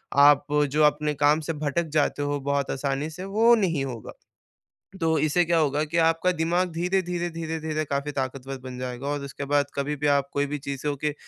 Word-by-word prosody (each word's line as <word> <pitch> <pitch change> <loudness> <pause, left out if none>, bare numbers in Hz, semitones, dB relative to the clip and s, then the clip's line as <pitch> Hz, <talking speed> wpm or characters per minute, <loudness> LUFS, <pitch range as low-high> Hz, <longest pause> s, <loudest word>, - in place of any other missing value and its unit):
आप, 145 0 +6 0.3
जो 150 +2 +3
अपने 150 0 +2
काम 145 +1 +3
से - - +1
भटक 155 +2 -1
जाते 145 -1 +1
हो 145 0 -1
बहुत 140 0 -1
आसानी 140 +2 -2
से, 180 +4 -8
वो 220 +4 +4
नहीं 170 -10 0
होगा। 120 -5 -7 0.9
तो 160 -1 +2
इससे 155 +4 +2
क्या 170 0 +2
होगा 150 -1 +1
कि 155 +2 -3
आपका 165 +2 +3
दिमाग़ 175 +2 0
धीरे-धीरे, 175 0 -1
धीरे-धीरे 160 -2 -3
काफ़ी 140 +1 -2
ताकतवर 135 0 -4
बन 130 -1 -7
जाएगा 125 +1 -5
और 145 0 -2
उसके 140 +1 -6
बाद 145 -1 +4
कभी 145 +1 -1
भी 145 +1 -1
आप 140 -1 +2
कोई 140 0 +1
भी 150 +1 -3
चीज़ों 140 +1 -3
के 150 +2 -1
150 Hz, 195 wpm, -25 LUFS, 140-165 Hz, 0.9 s, आप